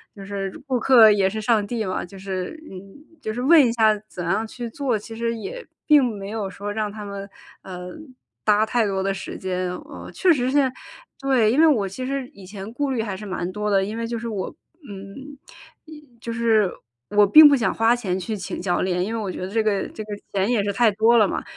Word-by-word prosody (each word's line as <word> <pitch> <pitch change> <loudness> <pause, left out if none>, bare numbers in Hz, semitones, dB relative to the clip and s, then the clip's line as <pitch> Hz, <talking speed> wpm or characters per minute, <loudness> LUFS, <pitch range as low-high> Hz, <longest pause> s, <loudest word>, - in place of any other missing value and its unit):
就 200 - -10
是 195 -1 -5
顾 255 -2 0
客 235 -5 +7
也 200 -2 +3
是 215 +3 -3
上 215 -2 +2
帝 220 0 -3
嘛， 185 - -3
就 190 +2 -13
是， 190 - -5
嗯， 185 - -8 0.4
就 220 -5 -4
是 245 - -4
问 305 +1 +6
一 - - 0
下 220 -2 +3
怎 175 - -7
样 195 +6 0
去 235 +1 -7
做， 250 -2 -1
其 225 +2 -10
实 230 0 -1
也 475 - -7 0.2
并 295 -3 +6
没 200 -4 -5
有 210 -3 -3
说 205 +2 -6
让 215 -1 -2
他 210 0 -8
们， 200 0 -7 0.3
呃， 180 -1 -8 0.5
搭 210 +1 +4
太 225 0 +1
多 190 -1 -1
的 195 - 0
时 195 - -7
间。 185 -1 -3
哦， - - -10
确 365 -3 +4
实 255 -2 0
现 285 +1 +3
在 260 -1 0 0.5
对， 255 -6 +2
因 265 - +1
为 325 - +7
我 220 -10 +2
其 255 +7 -6
实 275 -2 -3
以 195 - -16
前 200 +2 -8
顾 285 +2 -1
虑 240 - -1
还 205 -4 -4
是 210 - -10
蛮 185 -2 -4
多 210 +2 -3
的， 195 -1 +3
因 210 +3 -4
为 230 0 -3
就 235 0 -3
是 235 - -5
我 200 +2 -4 0.3
嗯 205 +9 -10 0.5
也 310 -1 -12 0.2
就 230 - -5
是 225 -4 +2 0.4
我 205 0 +5
并 305 +8 +10
不 285 - +5
想 235 - 0
花 225 +2 +3
钱 190 -6 -2
去 215 +4 -4
请 190 - -6
教 175 -1 0
练， 180 -1 0
因 225 - -4
为 225 - -2
我 195 -3 -3
觉 - - -7
得 - - -5
这 225 +1 +1
个 205 -3 0
这 215 - -7
个 210 - -16 0.2
钱 195 +3 +1
也 230 -5 +2
是 200 0 -1
太 230 +3 +4
多 225 +3 +4
了 215 - +5
嘛， - - -3
215 Hz, 260 characters per minute, -23 LUFS, 195-240 Hz, 0.5 s, 并